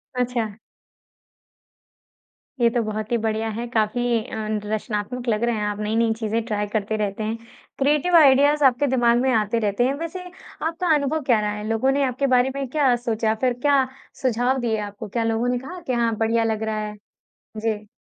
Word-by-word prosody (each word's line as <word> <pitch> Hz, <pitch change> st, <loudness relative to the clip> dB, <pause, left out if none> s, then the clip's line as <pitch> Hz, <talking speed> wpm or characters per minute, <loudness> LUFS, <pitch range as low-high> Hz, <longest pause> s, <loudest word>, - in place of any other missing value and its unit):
अच्छा। 240 Hz, -4 st, -1 dB, 2.1 s
ये 235 Hz, -, +5 dB
तो 235 Hz, 0 st, 0 dB
बहुत 215 Hz, +2 st, -4 dB
ही 235 Hz, -, +3 dB
बढ़िया 220 Hz, 0 st, -1 dB
है 230 Hz, +3 st, -4 dB
काफ़ी 225 Hz, +1 st, 0 dB, 0.2 s
अ, -, -, -7 dB, 0.4 s
रचनात्मक 220 Hz, +3 st, -3 dB
लग 215 Hz, +1 st, 0 dB
रहे 235 Hz, -1 st, +1 dB
हैं 210 Hz, -, -2 dB
आप 205 Hz, 0 st, -3 dB
नई-नई 225 Hz, +2 st, +1 dB
चीज़ें 225 Hz, 0 st, -2 dB
ट्राय 210 Hz, -2 st, -2 dB
करते 215 Hz, 0 st, -1 dB
रहते 210 Hz, 0 st, -2 dB
हैं 220 Hz, +2 st, -2 dB, 0.4 s
क्रिएटिव 300 Hz, +5 st, +2 dB
आइडियाज़ 285 Hz, 0 st, +5 dB
आपके 270 Hz, +2 st, +4 dB
दिमाग 240 Hz, -2 st, +3 dB
में 260 Hz, 0 st, +2 dB
आते 220 Hz, +1 st, +1 dB
रहते 210 Hz, +2 st, 0 dB
हैं 270 Hz, -, +1 dB
वैसे 335 Hz, +2 st, -5 dB, 0.4 s
आपका 335 Hz, 0 st, +1 dB
अनुभव 295 Hz, +2 st, 0 dB
क्या 220 Hz, -, +5 dB
रहा 210 Hz, 0 st, -1 dB
है, 210 Hz, +1 st, -5 dB
लोगों 225 Hz, +4 st, +2 dB
ने 280 Hz, +1 st, +1 dB
आपके 260 Hz, +2 st, -1 dB
बारे 250 Hz, +2 st, +3 dB
में 275 Hz, -1 st, -3 dB
क्या 270 Hz, -3 st, +3 dB
सोचा? 225 Hz, -2 st, 0 dB
फ़िर 250 Hz, +2 st, +1 dB
क्या 280 Hz, -2 st, +4 dB, 0.4 s
सुझाव 250 Hz, +1 st, +1 dB
दिए 225 Hz, -2 st, 0 dB
आपको? 205 Hz, +1 st, -6 dB
क्या 230 Hz, +3 st, -2 dB
लोगों 225 Hz, +1 st, 0 dB
ने 245 Hz, 0 st, +1 dB
कहा 355 Hz, +8 st, -8 dB
कि 255 Hz, -, 0 dB
हाँ, 230 Hz, -2 st, +1 dB
बढ़िया 225 Hz, +1 st, +1 dB
लग 220 Hz, -1 st, -1 dB
रहा 215 Hz, -1 st, -2 dB
है? 210 Hz, -, -8 dB, 0.6 s
जी। 215 Hz, -1 st, -2 dB
230 Hz, 190 wpm, -23 LUFS, 215-260 Hz, 2.1 s, ये